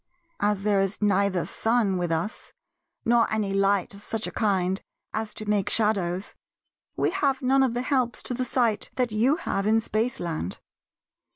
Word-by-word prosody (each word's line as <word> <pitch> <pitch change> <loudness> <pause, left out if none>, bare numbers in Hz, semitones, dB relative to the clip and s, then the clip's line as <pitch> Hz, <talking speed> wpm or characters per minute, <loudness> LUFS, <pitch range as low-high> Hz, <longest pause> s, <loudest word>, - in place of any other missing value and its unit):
As 205 -1 +1
there 205 -1 +3
is 195 0 -1
neither 200 -3 +2
sun 225 -4 +1
with 175 -2 -1
us, 165 +7 -3 0.5
nor 235 0 +3
any 210 -3 0
light 195 -1 +2
of 200 +1 -12
such 225 0 -3
a - - -4
kind 190 -3 0 0.3
as 220 -1 -2
to 215 - -7
make 205 -2 +1
shadows, 195 -4 0 0.6
we - - +1
have 280 -8 0
none 270 +1 +4
of 255 -3 +2
the 245 - -1
helps 255 -3 0
to - - -2
the 255 +1 -1
sight 240 -4 0
that 250 -3 0
you 235 +7 +3
have 200 - -2
in 220 +1 +4
Spaceland. 215 - -2
210 Hz, 170 wpm, -26 LUFS, 195-240 Hz, 0.6 s, none